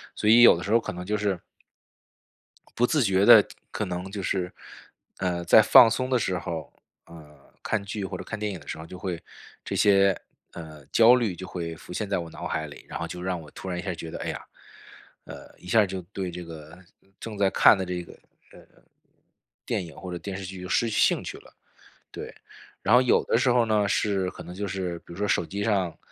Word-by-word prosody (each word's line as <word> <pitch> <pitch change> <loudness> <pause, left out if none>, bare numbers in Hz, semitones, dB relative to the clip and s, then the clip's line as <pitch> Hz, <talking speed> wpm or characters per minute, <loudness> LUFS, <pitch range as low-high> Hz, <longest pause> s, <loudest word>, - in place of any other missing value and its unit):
所 105 - 0
以 115 +2 +7
有 120 - +9
的 90 - -6
时 100 - -4
候 115 - +5
可 - - -5
能 90 +1 -7
就 105 +2 -1
是 100 -4 -1 1.4
不 120 - +3
自 150 -5 +2
觉 95 -1 +2
地 115 -3 +9 0.3
可 - - -3
能 90 +1 -5
就 100 -2 -5
是， 90 -1 -1 0.7
呃， 90 -2 -1
在 110 - +7
放 115 +2 +8
松 130 +3 -2
的 130 - +3
时 95 -5 -1
候， 85 -1 -6 0.3
呃， 75 -4 -16
看 105 -3 -2
剧 100 0 -5
或 - - -5
者 - - -7
看 115 - -6
电 105 -1 -2
影 90 - -7
的 - - -18
时 - - -5
候， 80 - -9
就 90 - -10
会 90 -2 -5 0.4
这 - - -4
些， 100 -1 +4 0.3
呃， 80 -4 -10
焦 115 +2 +7
虑 110 -8 -1
就 95 - -8
会 85 -2 -5
浮 80 - -13
现 105 0 -3
在 100 - 0
我 85 -1 -6
脑 - - -7
海 80 - -3
里。 70 - -13
然 - - -6
后 85 - -3
就 90 0 -7
让 90 -1 -2
我 75 - -13
突 95 - -8
然 90 - -3
一 - - -3
下 95 -2 -3
觉 80 0 -8
得， - - -6
哎 - - -4
呀， - - -6 0.8
呃， - - -11
一 90 - -14
下 110 +1 +4
就 95 -1 -5
对 95 -2 -4
这 90 +1 -7
个 80 0 -11 0.4
正 110 -3 -7
在 100 -1 +3
看 100 - +6
的 95 - -3
这 90 0 -4
个， - - -13 0.4
呃， - - -14 1.1
电 90 - -2
影 80 - -12
或 90 -1 -8
者 90 - -4
电 100 0 -6
视 100 - -7
剧 95 0 -8
就 90 - -7
失 115 - +1
去 105 - -2
兴 - - +3
趣 - - -7
了， - - -19 0.6
对。 - - -8 0.5
然 110 +5 +4
后 125 - +7
有 125 - +3
的 - - +2
时 125 +1 +2
候 120 -1 +3
呢 105 -2 +2
是 100 -3 0
可 - - -11
能 90 - -10
就 100 +1 -3
是 90 -2 -3
比 - - -36
如 - - -11
说 105 0 -1
手 85 - +1
机 100 +3 -5
上， 95 -6 0
95 Hz, 255 characters per minute, -26 LUFS, 90-105 Hz, 1.4 s, 有